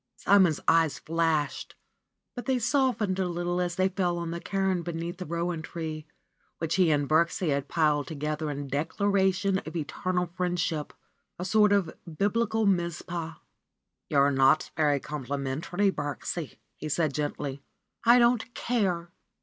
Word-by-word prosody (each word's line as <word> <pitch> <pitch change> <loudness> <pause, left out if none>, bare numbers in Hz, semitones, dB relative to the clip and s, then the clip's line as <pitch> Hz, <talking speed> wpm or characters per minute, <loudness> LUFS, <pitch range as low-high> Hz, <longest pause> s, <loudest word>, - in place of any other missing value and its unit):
Simon's 190 -6 +4
eyes 160 -2 +4
flashed, 160 -3 -1 0.6
but 245 - -6
they 260 -1 +2
softened 245 -6 +1
a 185 - +1
little 175 +1 -1
as 175 -1 -1
they 185 +1 +3
fell 180 -2 -1
on 170 -1 -3
the 170 - -4
cairn 195 +1 0
underneath 170 0 -4
the 180 - -5
rowan 170 0 -2
tree, 155 -1 -6 0.5
which 165 0 -2
he 185 -3 +4
and 145 -2 +2
Birksie 165 +2 +2
had 140 0 -1
piled 150 -4 +1
together 150 +1 -3
in 145 -1 -4
declaration 190 +6 +1
of 160 -2 -9
eternal 180 +3 -1
friendship, 175 -3 -2 0.4
a 180 - -4
sort 210 +2 +4
of 200 -5 +1 0.2
Biblical 220 +2 +1
Mizpah. 170 -3 -1 0.8
^'You - - 0
are 140 +1 +5
not 135 +3 +3
very 145 -2 +2
complimentary, 145 +8 -2
Birksie," 145 0 -4 0.2
he 155 - -5
said 155 -1 +1
gently. 145 -2 -3 0.4
don't 240 0 +4
care 185 -8 -1
170 Hz, 140 wpm, -28 LUFS, 155-190 Hz, 0.8 s, are